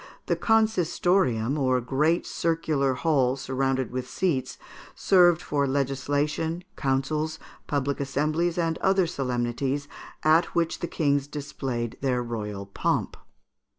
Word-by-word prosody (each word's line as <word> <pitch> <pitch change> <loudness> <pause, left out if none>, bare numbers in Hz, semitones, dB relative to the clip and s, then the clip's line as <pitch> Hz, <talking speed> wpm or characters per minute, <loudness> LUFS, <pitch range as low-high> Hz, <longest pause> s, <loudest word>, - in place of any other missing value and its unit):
The - - +1
consistorium, 180 - +2
or 130 -2 +2
great 150 +7 +1
circular 155 -5 0
hall 135 -3 +2
surrounded 130 -1 -1
with 125 0 -4
seats, 135 -9 -1 0.4
served 175 -3 +4
for 140 -1 0
legislation, 145 +5 -1
councils, 150 +4 -1 0.3
public 140 -1 -1
assemblies, 155 +5 0
and 165 -2 0
other 190 -1 +3
solemnities, 135 -1 -2 0.4
at 160 +2 +5
which 170 -1 0
the 170 - -3
kings 145 -4 0
displayed 135 -5 -4
their 125 -2 0
royal 105 -4 -5
pomp. 100 - -1
140 Hz, 115 wpm, -26 LUFS, 130-165 Hz, 0.4 s, at